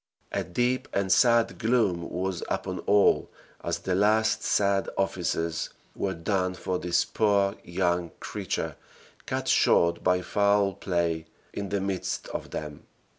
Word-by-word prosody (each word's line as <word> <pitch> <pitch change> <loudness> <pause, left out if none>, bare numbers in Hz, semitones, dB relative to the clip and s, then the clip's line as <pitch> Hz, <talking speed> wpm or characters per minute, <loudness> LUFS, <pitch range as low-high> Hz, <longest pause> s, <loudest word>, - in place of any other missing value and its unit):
A - - -1
deep 125 +7 0
and 100 -1 0
sad 115 -2 +4
gloom 110 -8 +1
was 95 0 -2
upon - - -2
all 100 0 +4 0.3
as - - -1
the 95 - -2
last 110 +3 +3
sad 100 -1 +1
offices 85 -3 -1 0.3
were 95 -1 -2
done 90 +1 -1
for 90 0 -2
this 90 -1 +1
poor 100 -2 +2
young 85 -1 0
creature - - -4 0.5
cut - - -2
short 85 0 +3
by 90 0 +2
foul 100 -1 +2
play 85 -4 -1 0.3
in 100 -1 -4
the 100 - 0
midst 95 -2 -3
of - - -5
them. 75 -1 -7
95 Hz, 135 wpm, -27 LUFS, 85-100 Hz, 0.5 s, sad